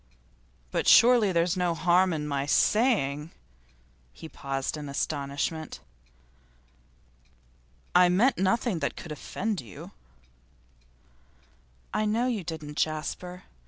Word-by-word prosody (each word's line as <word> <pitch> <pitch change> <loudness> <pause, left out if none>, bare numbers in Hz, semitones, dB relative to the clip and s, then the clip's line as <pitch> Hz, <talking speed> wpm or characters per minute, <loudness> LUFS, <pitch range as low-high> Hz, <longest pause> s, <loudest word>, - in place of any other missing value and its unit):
'But - - -1
surely 235 -4 +6
there's 170 0 +1
no 180 -2 0
harm 180 +2 +3
in 150 -2 -3
my 140 -1 -2
saying 155 - +2 0.4
' - - -35
he 160 - -8
paused 135 -2 -4
in 150 -2 -7
astonishment. 145 +2 -3 2.1
'I 180 0 +6
meant 215 +8 +2
nothing 195 0 +1
that - - -2
could 160 - -9
offend 200 +6 -4
you.' 105 -7 -11 2.0
'I 215 - 0
know 225 +4 +1
you 235 -7 -2
didn't, 155 -3 -7
Jasper. 180 +4 -3
165 Hz, 110 wpm, -27 LUFS, 145-190 Hz, 2.1 s, surely